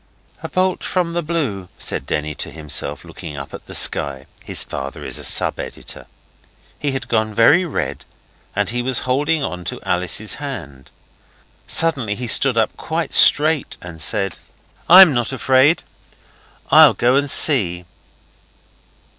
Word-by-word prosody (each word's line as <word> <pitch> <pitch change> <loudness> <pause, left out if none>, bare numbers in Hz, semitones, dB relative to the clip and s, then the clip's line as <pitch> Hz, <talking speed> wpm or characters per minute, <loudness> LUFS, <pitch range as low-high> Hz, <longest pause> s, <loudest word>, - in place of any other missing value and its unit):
'A - - -7
bolt 185 0 -1
from 175 -2 -2
the 175 - -2
blue,' 140 - -4
said - - -4
Denny 75 0 -3
to - - -7
himself, 75 -2 -2
looking 75 -3 -10
up 70 -1 -9
at - - -11
the - - -6
sky. 70 -1 +2 0.2
His - - -3
father 70 0 -8
is - - -4
a - - -10
sub - - +1
editor. - - -9 0.7
He 145 -2 -3
had 135 - -5
gone 110 -2 -2
very 145 - +4
red, 165 - -5 0.5
and 105 +1 -1
he 120 0 -3
was 125 0 -1
holding 145 +4 -1
on 90 -8 -5
to - - -5
Alice's 90 +4 -1
hand. 80 - -8 0.8
Suddenly 135 -11 +1
he 125 - -6
stood 125 +1 +2
up 110 - 0
quite 160 -2 -4
straight 155 0 +4
and 85 -2 -10
said 95 0 0 0.5
'I'm 180 -2 +8
not 120 -1 -1
afraid. 130 +4 +2 0.9
I'll - - +7
go 125 +2 +1
and 140 +1 0
see. 90 - +5
120 Hz, 150 wpm, -18 LUFS, 90-150 Hz, 0.9 s, I'm